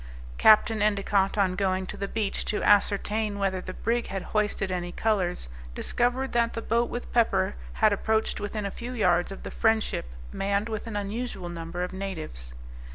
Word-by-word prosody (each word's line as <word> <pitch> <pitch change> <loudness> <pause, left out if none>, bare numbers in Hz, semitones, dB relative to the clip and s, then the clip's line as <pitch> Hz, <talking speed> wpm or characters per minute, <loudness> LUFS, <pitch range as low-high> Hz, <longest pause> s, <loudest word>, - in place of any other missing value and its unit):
Capt. 215 +1 +7
Endicott, 205 -2 +1
on 190 -2 +2
going 190 -1 0
to - - -7
the 200 - -3
beach 210 -1 -2
to 210 - -1
ascertain 205 +1 +2
whether 190 -2 0
the 185 0 -7
brig 235 +1 0
had 195 -1 -4
hoisted 210 -2 0
any 175 -1 -2
colors, 185 - 0 0.3
discovered 250 - 0
that 235 -1 +2
the 230 - -3
boat 235 +2 +1
with 240 - -6
pepper 235 -2 +3 0.2
had 215 - +4
approached 220 +2 0
within 205 0 -3
a 200 - -2
few 240 +5 -6
yards 180 -6 +2
of 195 - -8
the - - -6
Friendship, 220 - +1 0.3
manned 200 +3 0
with 220 +1 -4
an 225 - -5
unusual 205 -2 -3
number 170 +1 -4
of 180 - -4
natives. 160 - -6
205 Hz, 175 wpm, -27 LUFS, 190-220 Hz, 0.3 s, Capt